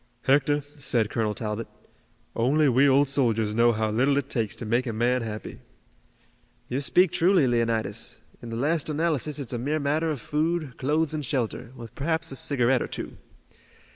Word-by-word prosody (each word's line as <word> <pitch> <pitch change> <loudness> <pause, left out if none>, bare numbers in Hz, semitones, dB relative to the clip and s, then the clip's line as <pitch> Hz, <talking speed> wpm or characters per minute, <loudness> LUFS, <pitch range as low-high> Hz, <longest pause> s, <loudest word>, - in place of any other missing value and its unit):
"Hector," 145 +2 +3
said 135 -6 -1
Colonel 110 -2 -1
Talbot, 110 +1 -4 0.7
"only 140 +6 +3
we 135 +2 +4
old 140 +2 +4
soldiers 115 -6 +1
know 120 +2 +4
how 110 -1 -1
little 135 +6 +2
it 140 -1 -2
takes 115 -5 -1
to - - -7
make 120 +4 0
a - - -1
man 120 +3 +1
happy." 110 -1 -6 1.1
"You 130 +3 -1
speak 180 +5 +3
truly, 175 -3 +3
Leonidas. 115 -3 -1 0.2
In 120 - -8
the 115 - -5
last 150 +6 0
analysis 150 -2 0
it's 135 -4 -5
a 120 - -2
mere 150 +6 -1
matter 155 +3 0
of 150 -4 -2
food, 155 0 -1
clothes 150 +3 0
and 155 -1 -3
shelter, 125 -3 -3
with 115 -2 -10
perhaps 160 +4 -2
a - - -5
cigarette 130 -2 +2
or - - -2
two. - - -7
130 Hz, 175 wpm, -26 LUFS, 115-150 Hz, 1.1 s, we